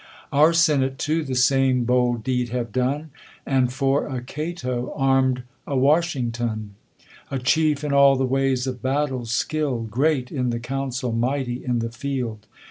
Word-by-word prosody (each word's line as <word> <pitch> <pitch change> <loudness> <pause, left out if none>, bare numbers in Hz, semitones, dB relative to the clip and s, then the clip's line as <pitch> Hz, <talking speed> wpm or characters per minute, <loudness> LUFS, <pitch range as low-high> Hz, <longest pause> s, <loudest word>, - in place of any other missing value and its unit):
Our 150 +3 +6
senate 145 -6 +2
too 155 +4 0
the 135 -3 -4
same 130 0 +3
bold 120 -1 +1
deed 125 -1 -1
have 120 -2 -3
done,, 140 +6 -1 0.3
And 130 -2 +2
for 135 +1 +1
a 130 -3 -3
Cato, 130 -4 -4
arm'd 135 -2 +2 0.2
a 140 - -1
Washington; 120 -8 0 0.6
A 135 - -2
chief, 150 +3 +1
in 145 -1 -1
all 140 0 +6
the 130 0 +1
ways 135 -1 +1
of 130 -2 -4
battle 130 -2 -1
skilPd, 115 -1 -1
Great 135 +1 +1
in 125 -4 -1
the 115 0 -2
council, 130 0 -3
mighty 125 +1 -1
in 125 -2 0
the 115 0 -2
field. 115 -4 -4
130 Hz, 155 wpm, -23 LUFS, 125-140 Hz, 0.6 s, Our